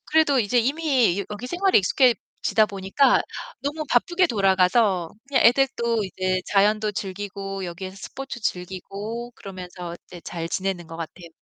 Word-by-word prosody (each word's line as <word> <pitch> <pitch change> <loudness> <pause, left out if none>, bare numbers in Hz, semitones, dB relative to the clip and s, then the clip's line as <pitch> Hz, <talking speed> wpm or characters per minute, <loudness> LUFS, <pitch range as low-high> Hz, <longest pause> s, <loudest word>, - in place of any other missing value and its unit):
그래도 310 -4 +4
이제 225 +2 +1
이미 260 - +2
여 - - -1
여기 210 +4 -6
생활에 370 +6 +3
익숙해지다 230 0 +2
보니까 200 +7 +2 0.4
너무 295 +2 -2
바쁘게 345 +9 +3
돌아가서 190 - +3 0.2
그냥 280 -1 +3
애들도 235 -3 +3
이제 185 -1 -1
자연도 210 +1 +3
즐기고 195 -1 -5
여기에서 185 +2 -7
스포츠 270 +5 -7
즐기고 200 +6 -4
그러면서 180 -4 -8
이제 175 -1 -11
잘 165 -1 -5
지내는 185 -3 -2
것 165 - -9
같아요. 170 +1 -7
205 Hz, 350 characters per minute, -24 LUFS, 185-245 Hz, 0.4 s, 그래도